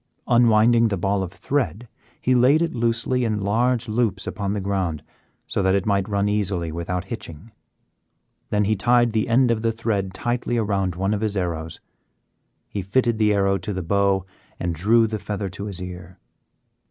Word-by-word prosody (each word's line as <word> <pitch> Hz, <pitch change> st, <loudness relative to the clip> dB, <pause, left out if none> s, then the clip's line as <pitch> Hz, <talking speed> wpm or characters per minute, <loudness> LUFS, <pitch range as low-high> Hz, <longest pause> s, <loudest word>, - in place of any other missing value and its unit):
Unwinding 115 Hz, 0 st, +5 dB
the 100 Hz, -3 st, -1 dB
ball 95 Hz, +2 st, 0 dB
of 90 Hz, -2 st, -4 dB
thread, 110 Hz, -, -2 dB, 0.3 s
he 130 Hz, -, +1 dB
laid 130 Hz, +6 st, +4 dB
it 170 Hz, -, -2 dB
loosely 120 Hz, +2 st, 0 dB
in 110 Hz, -3 st, 0 dB
large 120 Hz, +4 st, +1 dB
loops 105 Hz, -4 st, 0 dB
upon 100 Hz, -1 st, -3 dB
the 105 Hz, -, -2 dB
ground 95 Hz, -6 st, -2 dB, 0.4 s
so -, -, -2 dB
that 95 Hz, 0 st, +3 dB
it 100 Hz, -, 0 dB
might 100 Hz, -1 st, +1 dB
run 100 Hz, 0 st, +1 dB
easily 95 Hz, -5 st, 0 dB
without 85 Hz, +2 st, -3 dB
hitching, 100 Hz, -2 st, -8 dB, 1.0 s
then 105 Hz, 0 st, +1 dB
he 110 Hz, +2 st, +1 dB
tied 120 Hz, +3 st, +3 dB
the 110 Hz, -1 st, +1 dB
end 125 Hz, +1 st, +4 dB
of 110 Hz, -2 st, 0 dB
the 115 Hz, 0 st, +1 dB
thread 110 Hz, -4 st, -2 dB
tightly 120 Hz, +4 st, -2 dB
around 100 Hz, -5 st, 0 dB
one 95 Hz, +3 st, 0 dB
of 105 Hz, -, -2 dB
his 105 Hz, -2 st, -1 dB
arrows. 80 Hz, -3 st, -3 dB, 0.9 s
He 100 Hz, -, -4 dB
fitted 115 Hz, +4 st, +1 dB
the 105 Hz, -1 st, +4 dB
arrow 100 Hz, -1 st, +2 dB
to 100 Hz, +4 st, -4 dB
the 95 Hz, -1 st, -3 dB
bow 100 Hz, +1 st, +1 dB, 0.3 s
and 85 Hz, -1 st, -1 dB
drew 110 Hz, +8 st, +3 dB
the 110 Hz, -1 st, -3 dB
feather 100 Hz, -1 st, -4 dB
to 90 Hz, +3 st, -7 dB
his 100 Hz, -3 st, -6 dB
ear. 90 Hz, 0 st, -8 dB
100 Hz, 180 wpm, -23 LUFS, 95-115 Hz, 1.0 s, Unwinding